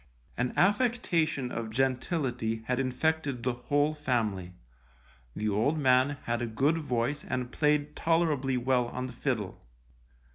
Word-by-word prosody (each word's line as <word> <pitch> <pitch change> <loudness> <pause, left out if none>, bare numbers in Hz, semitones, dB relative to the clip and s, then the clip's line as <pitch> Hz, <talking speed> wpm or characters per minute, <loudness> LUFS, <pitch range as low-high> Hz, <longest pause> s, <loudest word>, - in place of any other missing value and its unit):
An 125 +1 0
affectation 175 - +2
of 115 -1 -4
gentility 125 -2 -1
had 125 +2 0
infected 135 0 -1
the 125 0 +1
whole 145 +5 +1
family, 110 -11 -1 0.8
the 110 - -2
old 110 +10 +1
man 135 0 +3
had 120 0 -1
a 120 - -1
good 140 +9 +1
voice 140 0 -1
and 125 -1 -3
played 150 0 +1
tolerably 155 -6 +1
well 125 0 +1
on 125 +1 -4
the 125 - -7
fiddle. 115 -7 -3
130 Hz, 135 wpm, -29 LUFS, 120-150 Hz, 0.8 s, man